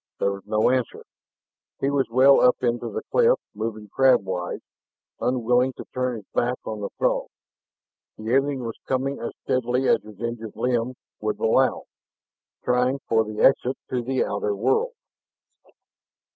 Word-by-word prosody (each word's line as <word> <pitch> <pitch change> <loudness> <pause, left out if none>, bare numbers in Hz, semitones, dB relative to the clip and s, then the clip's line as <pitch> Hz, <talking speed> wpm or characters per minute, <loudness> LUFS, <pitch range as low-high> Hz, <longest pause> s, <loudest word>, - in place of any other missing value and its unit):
There 100 - +1
was 100 0 -6
no 110 +3 +3
answer. 130 -2 -1 0.8
He 135 - 0
was 140 -2 +1
well 130 +4 +6
up 125 - +6
into 120 -1 0
the - - -5
cleft, - - +4
moving 110 0 -5
crabwise, 95 -7 +1 0.6
unwilling 125 +1 +2
to - - -9
turn 125 -1 -1
his 105 -3 -9
back 125 +1 +1
on 110 -1 -5
the 100 - -3
Throg. - - +1 0.9
The 110 +2 -3
alien 135 -1 +1
was 115 -1 -6
coming 135 +1 -1
as 115 - -5
steadily 125 +1 0
as - - +4
his 105 -2 -14
injured 115 -2 -5
limb 125 0 0 0.2
would 105 0 -2
allow, 130 +4 +2 0.8
trying 125 +2 +2
for 110 0 +3
the 110 0 -5
exit 135 -1 +4
to 125 -1 0
the 130 +2 0
outer 100 0 -1
world. 130 - +1
125 Hz, 150 wpm, -24 LUFS, 110-130 Hz, 0.9 s, well